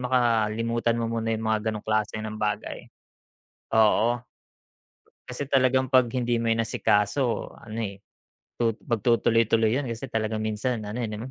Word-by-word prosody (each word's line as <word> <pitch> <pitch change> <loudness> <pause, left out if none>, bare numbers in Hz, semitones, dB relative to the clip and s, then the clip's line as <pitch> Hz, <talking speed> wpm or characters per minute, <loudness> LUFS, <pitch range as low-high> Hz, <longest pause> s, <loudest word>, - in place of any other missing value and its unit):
makalimutan 115 -2 +1
mo 115 - -1
muna 115 -1 -2
yung 110 - -5
mga 110 -1 +1
ganong 105 -1 -6
klase 110 0 0
ng 110 0 -5
bagay. 105 -1 -3 0.9
Oo. 115 +2 +3 1.0
Kasi 125 +3 -4
talagang 130 -1 +3
pag 130 -2 +5
hindi 120 -2 0
mo 115 - -1
inasikaso 115 +2 +1
ano, 110 0 -8
eh, 100 -2 -5 0.6
tu 115 -2 +1
pagtutuloy-tuloy 115 0 +2
yun 140 - -3
kasi 120 +3 -5
talagang 110 -1 -1
minsan 110 +2 -2
ano, 105 +3 -5
eh, 120 - -1
'no, 110 +5 -6
115 Hz, 145 wpm, -26 LUFS, 110-120 Hz, 1.0 s, pag